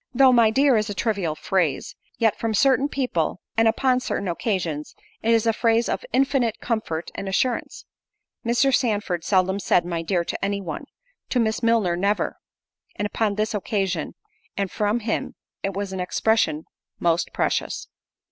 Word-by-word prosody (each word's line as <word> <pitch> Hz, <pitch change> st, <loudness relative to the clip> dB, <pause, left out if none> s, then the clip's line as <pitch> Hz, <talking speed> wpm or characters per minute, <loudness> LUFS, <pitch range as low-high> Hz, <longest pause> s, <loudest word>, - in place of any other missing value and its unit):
Though 265 Hz, 0 st, +6 dB
"my 230 Hz, -2 st, +6 dB
dear" 270 Hz, +1 st, +4 dB
is 215 Hz, 0 st, 0 dB
a 205 Hz, -, -4 dB
trivial 195 Hz, -9 st, -1 dB
phrase, 165 Hz, -4 st, -1 dB, 0.2 s
yet 225 Hz, -2 st, +2 dB
from 225 Hz, -1 st, -2 dB
certain 270 Hz, +4 st, +3 dB
people, 245 Hz, -, -1 dB, 0.2 s
and 225 Hz, 0 st, +4 dB
upon 250 Hz, +3 st, +2 dB
certain 200 Hz, -5 st, -3 dB
occasions, 170 Hz, -5 st, -2 dB, 0.3 s
it 225 Hz, -, -1 dB
is 230 Hz, 0 st, +3 dB
a 225 Hz, -, +3 dB
phrase 230 Hz, +1 st, +2 dB
of -, -, -2 dB
infinite 260 Hz, -4 st, +1 dB
comfort 215 Hz, -9 st, -3 dB
and 195 Hz, -, -5 dB
assurance. 240 Hz, +5 st, -1 dB, 0.6 s
Mr. 255 Hz, +3 st, +2 dB
Sandford 205 Hz, -9 st, 0 dB
seldom 190 Hz, 0 st, +2 dB
said 175 Hz, -3 st, +2 dB
"my 170 Hz, -1 st, -2 dB
dear" 170 Hz, +1 st, 0 dB
to -, -, -4 dB
any 200 Hz, 0 st, 0 dB
one; 185 Hz, -, -6 dB, 0.4 s
to 250 Hz, -, +1 dB
Miss 220 Hz, -1 st, +1 dB
Milner 230 Hz, -7 st, +2 dB
never; 200 Hz, +4 st, 0 dB, 0.6 s
and 205 Hz, -, -2 dB
upon 210 Hz, 0 st, 0 dB
this 215 Hz, +2 st, -1 dB
occasion, 195 Hz, -5 st, -2 dB, 0.4 s
and 200 Hz, -2 st, -1 dB
from 210 Hz, +3 st, 0 dB
him, 220 Hz, +1 st, -2 dB, 0.3 s
it 195 Hz, -, -2 dB
was 200 Hz, -1 st, -3 dB
an 190 Hz, -, -4 dB
expression 180 Hz, -3 st, +1 dB, 0.3 s
most 170 Hz, -1 st, +1 dB
precious. -, -, -1 dB
210 Hz, 165 wpm, -24 LUFS, 185-230 Hz, 0.6 s, Though